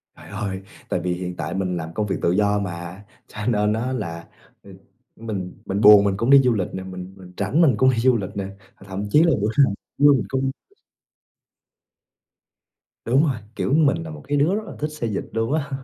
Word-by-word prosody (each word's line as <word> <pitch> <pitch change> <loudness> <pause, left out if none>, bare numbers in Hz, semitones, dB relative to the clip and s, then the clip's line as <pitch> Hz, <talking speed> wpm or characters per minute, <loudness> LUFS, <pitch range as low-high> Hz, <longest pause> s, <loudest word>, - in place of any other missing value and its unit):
Trời - - -14
ơi, 100 -2 -4 0.3
tại - - 0
vì 90 +1 -1
hiện 90 0 -5
tại 80 -3 -4
mình 90 -2 -2
làm 80 0 -6
công 105 +2 -2
việc 95 - -1
tự 85 - +2
do 105 +2 +2
mà, 90 0 -6 0.2
cho - - -15
nên 105 -3 +2
á, 120 +4 -2
là, 85 -8 -5 0.4
ừ, 100 - -13 0.4
mình 100 -5 -5
mình 100 +2 -2
buồn 105 -1 +9
mình 100 -1 0
cũng 115 +4 -1
đi 140 0 +8
du 125 -2 +3
lịch 95 -5 -1
nè, 95 - -5
mình 95 0 -8
mình 90 -1 -14
rảnh 105 - +1
mình 155 -6 +5
cũng 130 +5 +4
đi 125 - 0
du 130 0 +4
lịch 95 -4 -4
nè, 100 -1 -3 0.4
thậm 100 +1 -4
chí 150 +8 +5
là 170 - +4
bữa 105 - +1 0.2
nào 105 - -2 0.3
mình 140 -4 +5
cũng 135 0 -1 2.5
Đúng 130 +5 +3
rồi, 140 -7 0 0.2
kiểu, - - -1
mình 155 +1 +3
là 160 - -8
một 155 -1 -9
cái 145 +1 0
đứa 155 +7 +2
rất 215 - -2
là - - -9
thích 150 - -1
xê 150 -6 -5
dịch 105 - -3
luôn 115 +4 -1
á. 150 -3 -1
105 Hz, 220 wpm, -22 LUFS, 95-135 Hz, 2.5 s, buồn